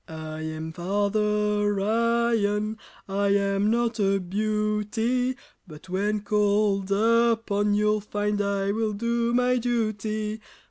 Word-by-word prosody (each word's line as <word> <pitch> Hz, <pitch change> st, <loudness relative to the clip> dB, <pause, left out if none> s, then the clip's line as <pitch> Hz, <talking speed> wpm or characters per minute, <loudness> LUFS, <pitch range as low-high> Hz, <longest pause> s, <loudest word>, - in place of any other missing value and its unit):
I 155 Hz, -1 st, -7 dB
am 160 Hz, 0 st, -5 dB
Father 205 Hz, +3 st, 0 dB
Iron! 220 Hz, -1 st, +1 dB, 0.3 s
I 200 Hz, +1 st, 0 dB
am 200 Hz, +1 st, +2 dB
not 235 Hz, 0 st, 0 dB
a 195 Hz, -1 st, +2 dB
beauty, 215 Hz, +5 st, -1 dB, 0.3 s
But 155 Hz, +2 st, -13 dB
when 205 Hz, +3 st, -1 dB
called 205 Hz, -1 st, +1 dB
upon, 225 Hz, -1 st, +2 dB
you'll 210 Hz, 0 st, +2 dB
find 205 Hz, 0 st, -1 dB
I 200 Hz, 0 st, 0 dB
will 220 Hz, 0 st, -1 dB
do 235 Hz, +2 st, 0 dB
my 250 Hz, +1 st, +2 dB
duty. 215 Hz, -2 st, -2 dB
210 Hz, 110 wpm, -25 LUFS, 200-225 Hz, 0.3 s, am